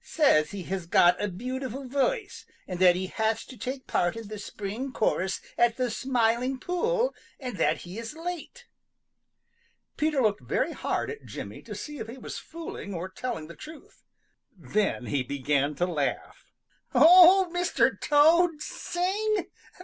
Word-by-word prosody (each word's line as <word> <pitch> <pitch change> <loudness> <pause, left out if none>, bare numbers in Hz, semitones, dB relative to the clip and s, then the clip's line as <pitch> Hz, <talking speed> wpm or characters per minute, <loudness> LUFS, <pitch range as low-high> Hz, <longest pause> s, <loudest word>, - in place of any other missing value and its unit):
"Says 155 - +3
he 200 -3 -6
has 185 -1 -4
got 175 +1 +4
a - - +1
beautiful 255 +6 -5
voice, 395 - -1 0.2
and 180 -1 -5
that 180 -1 +6
he 185 +1 -2
has 220 +3 -1
to 260 - -11
take 260 +4 -5
part 175 +2 0
in 225 -3 -8
the 215 -1 -6
spring 210 +6 -5
chorus 190 -5 0 0.2
at 240 -1 +3
the 250 -2 0
Smiling 250 +1 0
Pool 460 - 0 0.3
and 250 -6 -5
that - - +1
he 180 +5 -8
is 230 +5 -7
late." 355 +8 -6 1.3
Peter 305 -2 +1
looked 215 -4 +2
very - - -1
hard - - -2
at 445 - -9
Jimmy - - -8
to - - -8
see 295 -2 -7
if 220 - -5
he 235 +3 -9
was - - -7
fooling 320 - -7
or 175 +2 -4
telling 190 -6 -5
the 170 +2 -11
truth. 310 -1 -13 0.6
Then 175 -3 -1
he 140 +2 0
began 140 +2 0
to 175 - +1
laugh. 150 -6 -3 0.4
"Old 355 +5 +8
Mr. 355 0 +2
Toad 320 +2 +4
sing! 385 +6 -2
250 Hz, 155 wpm, -27 LUFS, -, 1.3 s, Old